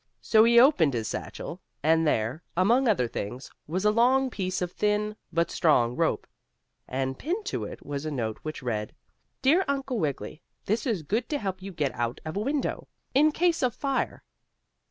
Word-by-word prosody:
So 220 -1 +5
he 235 0 +7
opened 180 - +5
his 110 -2 -2
satchel, - - -6 0.2
and 160 +1 +3
there, 125 +3 0 0.2
among 235 +8 +4
other 175 - +2
things, 120 +4 -6 0.2
was 185 +6 -2
a 210 - +6
long 255 +4 +3
piece 185 -3 -2
of 180 -1 -2
thin, 210 +1 0 0.2
but 170 0 +1
strong 125 -8 +3
rope. - - 0 0.6
And 130 0 -2
pinned 380 +7 -2
to 405 - -2
it - - -9
was 140 0 -4
a 155 - -2
note 115 -7 -3
which 155 -3 -6
read: 105 -4 -3 0.5
"Dear 325 +8 +5
Uncle 275 -3 -1
Wiggily. 150 0 -3 0.2
This 220 +7 0
is 205 -9 -1
good 220 - -1
to 295 - 0
help 190 -6 -4
you 195 +1 -7
get 150 -6 -1
out 120 0 -2
of 155 - -5
a - - 0
window, 275 +6 -2 0.3
in 300 +4 +5
case 340 +2 +1
of 250 -2 +1
fire." 275 -1 -2
190 Hz, 185 wpm, -27 LUFS, -, 0.6 s, he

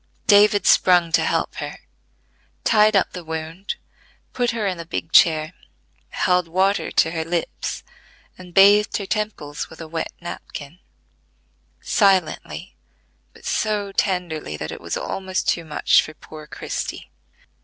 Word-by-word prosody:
David 205 -2 +5
sprung 175 -2 +4
to 165 - +3
help - - 0
her, - - -5 0.9
tied 215 -1 +4
up 195 - +2
the 180 - -8
wound, 160 +4 -5 0.6
put 245 -1 0
her 230 -3 -2
in 185 -3 -2
the - - -5
big 165 -1 -4
chair, 160 -2 +5 0.6
held 180 -1 +1
water 190 +4 +1
to 160 - +2
her 165 -1 -2
lips, 165 - -3 0.5
and 180 -1 -13
bathed 205 +3 +5
her 200 - -5
temples 200 -8 -3
with 160 - -14
a 165 - -7
wet 165 +1 -4
napkin; 170 -2 -8 1.0
silently, 195 -3 +1 0.6
but - - -18
so 210 -2 -1
tenderly, 175 - -2
that 75 +1 -5
it - - -8
was - - -3
almost 190 -1 -3
too 170 - +1
much 155 -2 +3
for 155 - -9
poor 155 0 -12
Christie. - - -5
180 Hz, 140 wpm, -22 LUFS, 160-200 Hz, 1.0 s, David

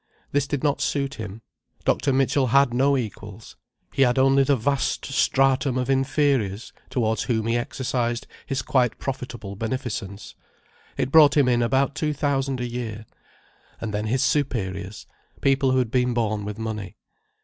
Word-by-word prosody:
This 140 -1 +1
did 140 -2 -3
not 145 -2 +1
suit 140 -1 -1
him. 110 +1 -7 0.4
Dr. 140 - +2
Mitchell 135 0 +2
had 140 0 +4
no 135 +3 +3
equals: 105 -2 -7 0.4
he - - 0
had 125 -1 +4
only 135 +1 +5
the 140 +1 +3
vast 135 +3 -1
stratum 135 -1 +2
of 130 +1 0
inferiors, 135 -6 0 0.2
towards 110 -3 0
whom 110 -4 0
he 115 +1 +1
exercised 120 -1 -2 0.2
his 135 -3 -2
quite 125 -3 +1
profitable 120 -6 -5
beneficence—it 110 +2 -6
brought 150 -2 +7
him 140 -3 +4
in 120 -1 +3
about 135 +3 +1
two 150 +1 -1
thousand 135 -2 -1
a 125 - -2
year: 115 -3 -5 0.7
and 110 -2 -4
then 105 +1 -2
his 125 +4 +1
superiors, 100 -9 -2 0.3
people 135 -1 +2
who 130 - +2
had 125 -3 0
been 125 -1 +1
born 110 -3 -1
with 105 0 -5
money. 105 -4 -5
125 Hz, 155 wpm, -24 LUFS, 110-135 Hz, 0.7 s, brought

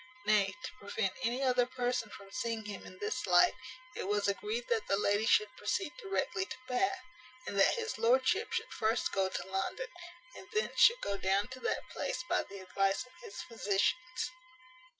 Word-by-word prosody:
Nay, 205 -2 +3
to - - -4
prevent 200 -1 -1
any 250 +2 0
other 250 -2 +3
person 245 -3 -1
from 195 -1 -12
seeing 230 -3 -2
him 205 -2 -7
in 185 - -12
this 205 +4 -2
light, 175 -1 +6 0.4
it - - -3
was 205 0 +1
agreed 430 - -1
that 465 -3 0
the 195 - +2
lady 205 +2 +2
should 430 +3 +4
proceed 385 -8 -1
directly 390 -2 -1
to - - -6
Bath, 370 +9 0 0.4
and - - -4
that 195 - +6
his 450 - -3
lordship 260 - +3
should - - -2
first 225 +1 +1
go 190 -1 +1
to - - -4
London, 195 - -2 0.5
and - - -10
thence 430 +1 0
should 480 +1 +7
go 200 - -1
down 195 +2 +2
to 260 0 -8
that - - -2
place - - -2
by - - +2
the 200 - -9
advice 195 +4 0
of 255 - -19
his 450 -5 -7
physicians. 230 - 0
230 Hz, 185 wpm, -33 LUFS, -, 0.5 s, should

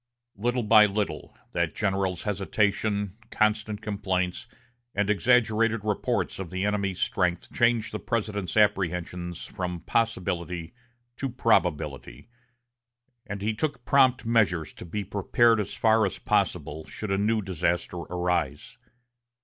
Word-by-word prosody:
Little 120 +4 0
by 105 0 +7
little, 100 -6 -3
that - - -1
general's 95 -3 -1
hesitation, 105 0 0
constant 110 0 0
complaints, 95 -4 -2 0.5
and 100 +1 +2
exaggerated 115 +1 +3
reports 105 -2 -1
of 95 -3 -5
the 95 +2 -2
enemy's 100 -3 -1
strength 90 -2 0
changed 115 -2 +2
the 105 - -4
President's 105 -5 -2
apprehensions 90 -4 0
from 90 -4 -5
possibility 90 -6 -1 0.4
to 135 - -2
probability; 95 - 0 1.0
and 100 -1 -5
he 110 +1 +1
took 125 +1 -3
prompt 130 -3 +4
measures 100 -9 +2
to - - -10
be 100 +5 -3
prepared 110 +4 +3
as 105 -2 -3
far 110 0 +4
as 95 - -6
possible, 80 +2 -1
should 105 -2 -5
a 95 - +2
new 110 +2 +2
disaster 90 -1 -1
arise. 85 -4 -2
100 Hz, 125 wpm, -27 LUFS, 90-110 Hz, 1.0 s, by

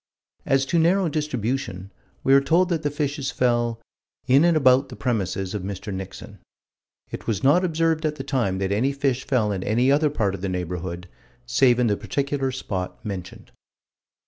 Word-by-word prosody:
As 135 0 +3
to 170 +4 +1
narrow 175 +2 +3
distribution, 125 - -3 0.3
we 135 - +4
are 140 - +7
told 170 +6 +2
that 165 -3 0
the 145 - 0
fishes 145 -1 -2
fell 120 -4 0 0.5
"in 135 +4 +5
and 170 -2 +4
about 135 -1 +4
the 125 - -8
premises 100 -6 -2
of 105 - -3
Mr. 100 +1 -5
Nixon." 95 0 -8 0.7
"It - - -7
was 110 -4 -1
not 150 +7 +4
observed 165 -2 +1
at 155 -1 0
the - - -6
time 115 -9 -1
that 95 0 -2
any 125 +7 +1
fish 135 -2 -1
fell 115 -6 +1
in 95 -2 -2
any 120 +6 +2
other 150 +2 +3
part 105 -9 -1
of 100 - -6
the 100 - -2
neighborhood, 90 0 -4 0.4
save 125 0 +3
in 125 - +2
the 105 -3 +2
particular 140 -1 -2
spot 95 -8 -5
mentioned." 95 -4 -7
130 Hz, 180 wpm, -24 LUFS, 100-145 Hz, 0.7 s, are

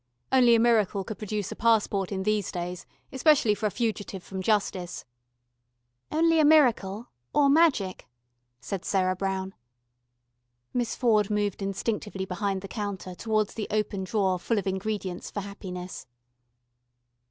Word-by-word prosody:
"Only 245 -3 +6
a - - +4
miracle 215 -4 +3
could 205 +1 -7
produce 210 -2 -3
a - - -5
passport 210 -4 +2
in 190 -1 -2
these 210 -1 0
days, 175 0 -5 0.2
especially 265 -5 +4
for 210 +1 -1
a - - 0
fugitive 205 -4 -3
from 190 -1 -6
justice." 185 -3 -1 1.1
"Only 330 +1 +3
a - - +5
miracle 240 -8 +3 0.2
or 280 -1 +5
magic," 275 - +2 0.5
said 190 +8 -5
Sarah 185 -2 +1
Brown. 190 0 -3 1.2
Miss 245 -2 -1
Ford 215 -5 +2
moved 205 -2 -1
instinctively 195 0 -3
behind 190 +1 -2
the - - -5
counter 200 -3 -5
towards 215 +2 -1
the 215 - -4
open 210 -2 -1
drawer 190 -2 0
full 230 +5 -1
of 205 - -1
ingredients 190 -1 -3
for 205 - -4
happiness. 185 -5 -7
205 Hz, 140 wpm, -27 LUFS, 190-225 Hz, 1.2 s, Only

